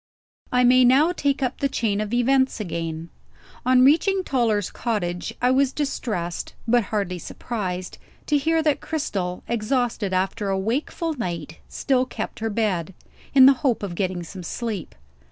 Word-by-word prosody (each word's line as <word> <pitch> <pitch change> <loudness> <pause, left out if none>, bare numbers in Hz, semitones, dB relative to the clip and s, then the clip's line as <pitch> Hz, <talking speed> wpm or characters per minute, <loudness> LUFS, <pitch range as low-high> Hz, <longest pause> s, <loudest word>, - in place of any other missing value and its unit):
I 250 0 +3
may 255 +1 +6
now 275 +7 +5
take 285 -5 0
up 255 0 -2
the 275 - +1
chain 215 -6 0
of 215 0 -4
events 260 +1 +2
again. 165 -4 -4 0.6
On 255 0 +6
reaching 375 +7 +3
Toller's 225 - 0
cottage, 180 -7 -2
I 250 - +4
was 265 0 +3
distressed 220 - -3
(but 240 -1 +3
hardly 190 -3 -2
surprised) 185 -4 -5 0.3
to 300 - +1
hear 320 +3 +1
that 300 -2 +1
Cristel, 195 - -3
exhausted 235 -2 -1
after 190 +2 -1
a 195 - +1
wakeful 275 - -2
night, 170 - -5
still 260 -2 +1
kept 220 - -5
her 225 0 -1
bed, 190 -5 -1 0.4
in 265 -1 +9
the 275 - +8
hope 245 -6 +1
of 195 -3 -3
getting 180 -1 -2
some 185 +2 -9
sleep. 210 0 -5
230 Hz, 155 wpm, -23 LUFS, 185-265 Hz, 0.6 s, in